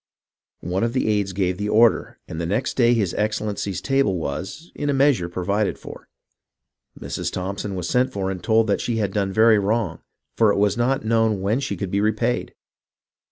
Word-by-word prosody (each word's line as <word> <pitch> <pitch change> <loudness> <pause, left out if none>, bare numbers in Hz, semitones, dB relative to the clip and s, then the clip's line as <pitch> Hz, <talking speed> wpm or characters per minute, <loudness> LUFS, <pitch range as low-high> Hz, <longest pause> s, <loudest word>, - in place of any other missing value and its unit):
One 90 +3 -1
of 115 0 0
the 130 - 0
aides 105 -2 +1
gave 90 -1 -1
the 105 0 -2
order, 115 +1 +3
and 80 - -5
the 85 - -2
next 105 +8 -1
day 120 -1 +3
his 100 -6 0
Excellency's 105 -3 -2
table 135 -9 +1
was, 95 - -5
in 145 - -3
a 140 - +1
measure, 135 -10 +2
provided 100 +4 -1
for. - - -11 0.9
Mrs. - - -4
Thompson 100 +2 -4
was 90 -2 -3
sent 125 +5 +1
for 95 -3 -2
and 90 -2 -6
told 110 0 +3
that 100 - 0
she 120 - -2
had 100 -3 -1
done 100 -2 0
very 110 +1 +5
wrong, 110 +3 -1 0.4
for 110 -2 +4
it - - 0
was 100 -1 +2
not 125 +2 0
known 110 -2 +2
when 105 +6 +1
she 140 - -3
could 100 -3 -4
be 100 - +1
repaid. 110 +3 -1
105 Hz, 195 wpm, -22 LUFS, 95-115 Hz, 0.9 s, very